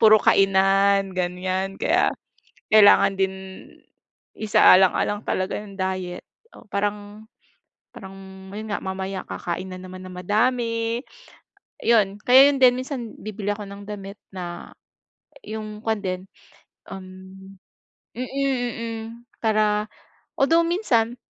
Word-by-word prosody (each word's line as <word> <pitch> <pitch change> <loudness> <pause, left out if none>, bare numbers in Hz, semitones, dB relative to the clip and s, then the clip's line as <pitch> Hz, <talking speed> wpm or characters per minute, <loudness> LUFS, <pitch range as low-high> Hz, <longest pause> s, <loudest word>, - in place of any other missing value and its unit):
puro 215 -1 +8
kainan 195 0 +3
ganiyan, 185 +2 -2
kaya - - +2 0.6
kailangan 205 -2 +6
din 190 0 +1 1.0
isaalang-alang 205 0 +4
talaga 185 0 -1
yung 200 -1 -11
diet. 185 -1 -3 0.3
Oh, - - -14
parang 205 +1 -3 0.7
parang 190 -2 -10 0.4
yun 215 +1 -6
nga, - - 0
mamaya 190 0 -4
kakain 185 +2 -5
na 185 - -7
naman 185 0 -10
ng 185 - -9
madami, 230 +3 0 0.8
'yon. 210 -4 +3
Kaya 265 +3 +7
yun 275 - -2
din 250 -1 +7
minsan, 255 -4 -5
bibili 210 -1 -6
ako 205 0 -6
ng 200 0 -10
damit 200 -1 -8
na 175 -2 -7 0.7
yung 215 -1 -7
kuwan 220 -2 0
din, 185 0 -3 0.7
um 190 -1 -7 1.1
mm, 255 +1 -5 0.5
mm, 230 -1 -5 0.4
para 215 -1 +2 0.5
although 330 +5 +4
minsan, 245 - +1
205 Hz, 115 wpm, -23 LUFS, 190-225 Hz, 1.1 s, puro